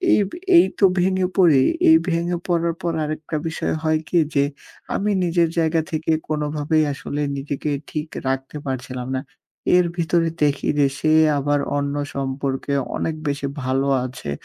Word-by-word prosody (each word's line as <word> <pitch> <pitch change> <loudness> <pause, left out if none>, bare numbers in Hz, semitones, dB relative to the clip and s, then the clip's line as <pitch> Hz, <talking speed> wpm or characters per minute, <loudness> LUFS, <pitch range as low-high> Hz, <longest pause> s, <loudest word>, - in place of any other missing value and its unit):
এইব 205 - +2 0.3
এই 345 - +8
তো 200 - +6 0.2
ভেঙে 185 0 +1
পড়ি। 160 -8 +6 0.3
এই 320 - +8
ভেঙে 170 +1 0
পড়ার 170 -1 +1
পর 170 - -1
আরেকটা 155 +1 -4
বিষয় 165 - -2
হয় 155 -1 +2
কি 175 - +2 0.2
যে, 140 - +4 0.5
আমি 210 +1 0
নিজের 170 -1 +2
জায়গা 160 0 +2
থেকে 160 0 -1 0.2
কোনভাবেই 150 +1 0
আসলে 145 +2 -4 0.2
নিজেকে 140 +1 -4 0.2
ঠিক 155 +1 -3 0.2
রাখতে 135 +2 -2
পারছিলাম 130 -1 -4
না। 130 - -2 0.6
এর 180 - +4
ভিতরে 165 0 +1
দেখি 145 -1 +1
যে 140 - +5
সে, 155 - +2 0.3
আবার 145 +1 +1 0.2
অন্য 140 0 -1 0.2
সম্পর্কে 135 0 -2 0.2
অনেক 160 - -2
বেশি 140 -1 -1 0.2
ভালো 135 +2 0 0.2
আছে। 130 - -7
155 Hz, 155 wpm, -22 LUFS, 140-170 Hz, 0.6 s, এই